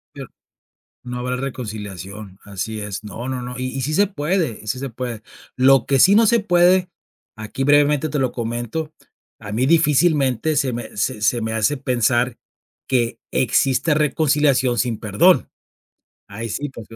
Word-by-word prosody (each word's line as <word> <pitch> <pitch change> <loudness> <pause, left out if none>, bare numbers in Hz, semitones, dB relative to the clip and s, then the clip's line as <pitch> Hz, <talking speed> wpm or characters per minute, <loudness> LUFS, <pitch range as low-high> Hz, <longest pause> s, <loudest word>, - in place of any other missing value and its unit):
Pero, - - -8 0.7
no 125 0 -6
habrá 125 0 -2
reconciliación, 105 -6 -7
así 105 +2 -5
es. 105 0 -6
No, 115 +4 -7
no, 130 -1 -3
no, 125 0 -6
y 130 - -3
y 135 +1 -5
sí 150 +4 -2
se 205 +3 +4
puede 170 - -2
y - - -15
sí 125 +4 -2
se 135 -1 -5
puede. 115 -2 -6 0.3
Lo 130 -1 +4
que 135 -1 +2
sí 195 +9 +6
no 225 +1 +5
se 235 +1 +3
puede, 180 -1 +3 0.5
aquí, 110 +5 -4
brevemente, 145 +1 +3
te 150 - -2
lo 130 -2 0
comento, 120 +7 -4 0.5
a 100 - -8
mí, 120 +4 0
difícilmente, 150 -3 +2
se 130 -3 +1
me 120 -1 -7
se 105 +1 -1
se 120 +2 +2
me 110 0 -3
hace 110 +6 +1
pensar 125 -2 0 0.5
que 120 -3 0
exista 135 +5 +1
reconciliación 145 -4 +2
sin 120 -2 -1
perdón. 155 - +3 0.8
Ahí 115 +3 -6
sí, 145 +6 -4
por 115 -4 -11
que 115 - -13
130 Hz, 170 wpm, -20 LUFS, 115-150 Hz, 0.8 s, sí